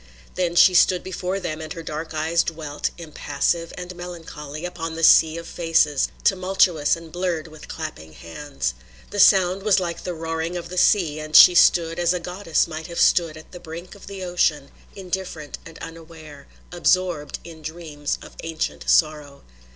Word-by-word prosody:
Then 175 -2 -1
she 185 +1 +7
stood 180 0 +4
before 185 +1 -3
them 160 -4 -5
and 155 -1 -6
her 165 - -8
dark 155 +1 -6
eyes 160 +2 +1
dwelt, 155 -3 -4
impassive 165 +1 -2
and 180 0 -7
melancholy, 165 -3 -8
upon 165 -2 -5
the 165 - -5
sea 160 0 +6
of 170 - -7
faces, 160 -4 +1 0.2
tumultuous 185 -5 +2
and 165 -1 -12
blurred 175 -2 -2
with 155 -1 -13
clapping 150 - -7
hands. 135 - -5 0.4
The 205 - -4
sound 190 -1 +5
was 205 -1 +3
like 170 -2 -4
the 180 -1 -4
roaring 165 +1 -3
of 170 0 -7
the 180 - -7
sea 165 -8 +3
and 155 0 -5
she 180 - +10
stood 170 -1 +4
as 175 +1 +2
a - - -2
goddess 180 0 -1
might 160 0 -7
have 170 -1 -6
stood 165 -3 +3
at 155 - -14
the 180 - -10
brink 170 +1 -9
of 200 - -14
the 195 -1 -7
ocean, 155 -6 0 0.2
indifferent 185 -5 -5
and 165 - -13
unaware, 160 -3 -11 0.2
absorbed 175 -4 0
in 165 -2 -12
dreams 155 -2 -5
of - - -13
ancient 165 -1 -4
sorrow. 150 -3 +1
165 Hz, 175 wpm, -23 LUFS, 155-180 Hz, 0.4 s, she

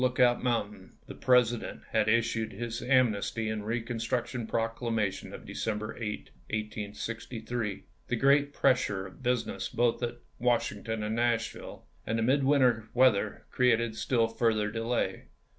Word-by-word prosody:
Lookout 125 -1 +3
Mountain 105 -6 -2
the - - -8
President 125 -2 +2
had 110 -1 +2
issued 115 -1 +1
his 120 +3 -4
Amnesty 115 -3 +2
and 110 -1 -2
Eeconstruction 115 +1 -2
Proclamation 115 -3 -1
of - - -9
De - - -8
cember 110 0 -3
8, 105 -3 -5 0.2
1863. 110 +1 -4 0.2
The 125 - 0
great 140 +3 +4
pressure 125 -9 +2
of 95 +8 -12
business 125 -1 -1
both 120 0 +1
at 120 0 -2 0.2
Washington 115 -2 0
and 105 +1 -1
Nashville 115 -1 -1 0.2
and 115 - -1
the 115 - +1
mid 135 +4 +3
winter 130 -5 +3
weather 115 -5 +3
created 115 -3 +2
still 115 0 +1
further 110 -2 +1
delay. 115 -4 -1
115 Hz, 135 wpm, -30 LUFS, 110-125 Hz, 0.2 s, great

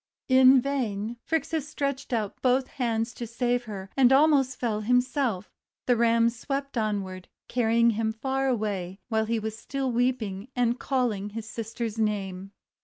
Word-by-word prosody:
In 260 0 +7
vain 235 -5 -2
Phrixus 320 -1 -1
stretched 280 -3 -3
out 215 -4 -2
both 255 +1 +2
hands 235 -2 -1
to 235 - -6
save 245 +1 -1
her, 195 -3 -7
and 260 -2 +5
almost 270 -2 +4
fell 220 -3 -1
himself; 245 -3 0 0.3
the 245 - +3
Ram 230 0 +3
swept 275 +3 -4
onward, 200 -5 -2 0.2
carrying 235 -1 +3
him 220 0 -1
far 265 +4 -1
away, 205 -6 -2
while 220 -1 +1
he 230 +1 0
was 220 0 -4
still 265 +3 -3
weeping, 230 -4 -1
and 245 -1 +1
calling 235 -7 -1
his 220 +1 -7
sister's 225 0 -5
name. 195 -3 -2
235 Hz, 150 wpm, -27 LUFS, 215-260 Hz, 0.3 s, In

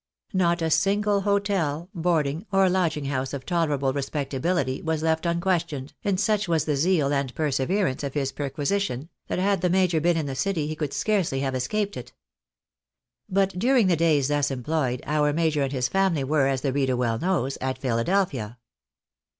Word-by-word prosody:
Not 175 -2 +2
a 160 - 0
single 200 +3 +2
hotel, 195 -6 0
boarding, 165 0 0
or 195 -1 +4
lodging 170 -5 0
house 135 -1 -2
of 135 -2 -5
tolerable 150 -6 0
respectability 140 0 -1
was 160 -1 -2
left 160 +1 +1
un 170 0 0
questioned, 170 -7 -1
and 195 -2 0
such 210 -1 +1
was 165 -3 +1
the 150 - 0
zeal 150 -1 +2
and 140 -2 -1
perseverance, 150 +2 0
of 140 0 -4
his 135 -2 0
perqui 140 -2 -4
sition, 165 -5 -1 0.2
that - - -2
had 195 0 +1
the 180 - +2
major 180 -3 +2
been 170 +1 +2
in 160 - -1
the 140 - -3
city 165 +2 -1
he 155 +1 -3
could 150 -3 -3
scarcely 185 -11 0
have 135 -1 -1
escaped 200 +11 -1
it. 125 0 -8 1.2
But 195 0 +2
during 245 +1 +4
the 180 -2 +3
days 155 -4 +2
thus 145 -1 +1
employed, 130 -1 -2
our 150 -1 +1
major 155 -2 +1
and 135 -1 0
his 125 -2 0
faimly 190 -4 +1
were, 140 0 +2
as 135 -1 0
the 135 -2 -1
reader 135 -2 +1
well 115 -2 0
knows, 165 -8 0
at 130 0 -2
Philadelphia. 125 - -1
155 Hz, 180 wpm, -25 LUFS, 135-185 Hz, 1.2 s, or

